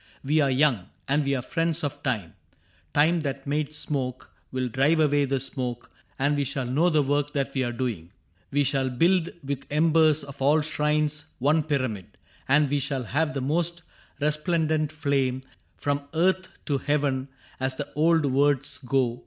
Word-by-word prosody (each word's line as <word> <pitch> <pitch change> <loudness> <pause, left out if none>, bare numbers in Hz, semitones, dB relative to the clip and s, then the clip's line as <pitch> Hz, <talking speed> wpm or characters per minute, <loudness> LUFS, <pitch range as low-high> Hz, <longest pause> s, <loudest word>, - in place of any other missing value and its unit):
We 150 +3 +2
are 140 -2 +3
young, 130 -8 +2 0.2
And 145 +2 +2
we 140 0 0
are 125 - -3
friends 165 0 -1
of 145 0 -3
time. 110 - -2 0.6
Time 160 +4 +3
that 140 -3 -4
made 150 +1 -1
smoke 130 -4 -3 0.2
Will 130 -1 -1
drive 135 +7 +2
away 145 -2 +3
the 135 0 0
smoke, 125 -2 -4 0.3
and 140 +2 +2
we 145 - +1
shall 135 -1 -2
know 145 +8 +2
The 155 -3 +3
work 145 +1 0
that 140 -1 -1
we 130 - 0
are 120 - -1
doing. 115 -9 -4 0.4
We 145 +1 +2
shall 135 -1 +1
build 170 +7 +2
With 140 -1 -4
embers 155 0 +3
of 140 -1 -11
all 150 +3 +4
shrines 150 0 0
one 150 +5 +3
pyramid, 130 - -3 0.3
And 145 +2 +4
we 145 - +2
shall 135 -1 -1
have 155 +6 -1
the 135 - -1
most 170 +5 0 0.4
resplendent 155 0 +1
flame 135 -4 0 0.3
From 145 0 -2
earth 185 +3 +2 0.2
to 140 -3 0
heaven, 140 -2 0 0.3
as 130 0 -1
the 145 +1 -6
old 160 +1 +3
words 145 +1 +1
go. 125 -3 0
145 Hz, 170 wpm, -26 LUFS, 130-150 Hz, 0.6 s, all